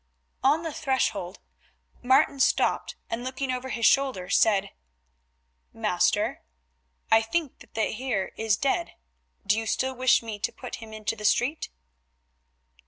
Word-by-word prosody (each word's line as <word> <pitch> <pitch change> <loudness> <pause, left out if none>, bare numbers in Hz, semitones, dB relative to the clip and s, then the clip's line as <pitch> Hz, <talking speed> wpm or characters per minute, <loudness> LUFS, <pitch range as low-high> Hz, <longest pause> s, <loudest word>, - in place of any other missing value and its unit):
On 295 +5 +3
the 325 -2 -4
threshold 215 - -1 0.6
Martin 270 +2 +3
stopped, - - +2 0.2
and 230 +1 -3
looking 260 +1 -3
over 255 +1 -4
his 230 -2 -1
shoulder 260 -10 +2
said, 200 -2 +3 1.0
"Master, - - +1 0.7
I 225 - +7
think 290 +5 -2
that - - -18
the 220 - +2
Heer 220 -5 -2
is 220 -3 +1
dead, 280 +7 -1 0.5
do 210 +2 +2
you 225 - -5
still 260 +4 0
wish 255 0 +3
me 220 -2 -6
to - - -1
put 250 - -8
him 225 -1 -11
into 215 0 -3
the 210 - -10
street?" 250 +8 +1
245 Hz, 140 wpm, -26 LUFS, 220-265 Hz, 1.0 s, I